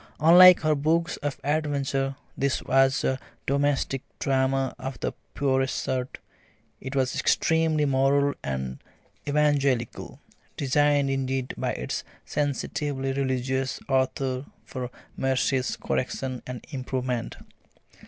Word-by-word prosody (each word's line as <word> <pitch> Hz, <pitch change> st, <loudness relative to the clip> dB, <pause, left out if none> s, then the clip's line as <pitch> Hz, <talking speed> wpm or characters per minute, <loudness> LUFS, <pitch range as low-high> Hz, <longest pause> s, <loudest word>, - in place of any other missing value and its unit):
Unlike 180 Hz, +4 st, +9 dB
her 155 Hz, -1 st, +3 dB
books 160 Hz, +4 st, +1 dB
of 145 Hz, -1 st, -4 dB
adventure, 140 Hz, -2 st, 0 dB, 0.2 s
this 140 Hz, 0 st, 0 dB
was 135 Hz, +1 st, +3 dB
a 130 Hz, 0 st, 0 dB, 0.3 s
domestic 140 Hz, -1 st, 0 dB, 0.2 s
drama 135 Hz, 0 st, +1 dB
of 130 Hz, -1 st, -6 dB
the -, -, -2 dB, 0.2 s
purest 135 Hz, -2 st, +1 dB
sort; 130 Hz, 0 st, -2 dB, 0.6 s
it 130 Hz, +1 st, -6 dB
was 130 Hz, -2 st, +1 dB
extremely 160 Hz, -2 st, +2 dB
moral 140 Hz, +1 st, +3 dB
and 65 Hz, -1 st, -3 dB, 0.5 s
evangelical, 140 Hz, -5 st, +1 dB, 0.4 s
designed 145 Hz, 0 st, +2 dB
indeed 135 Hz, -1 st, -2 dB
by -, -, -2 dB
its 65 Hz, -, -4 dB, 0.2 s
sensitively 140 Hz, -1 st, -2 dB
religious 130 Hz, -1 st, -1 dB
author 130 Hz, 0 st, 0 dB, 0.2 s
for 125 Hz, -2 st, -5 dB, 0.3 s
Marcie's 130 Hz, 0 st, +1 dB
correction 130 Hz, -1 st, -3 dB
and 125 Hz, -2 st, -7 dB
improvement. 130 Hz, -2 st, -3 dB
135 Hz, 105 wpm, -26 LUFS, 130-145 Hz, 0.6 s, Unlike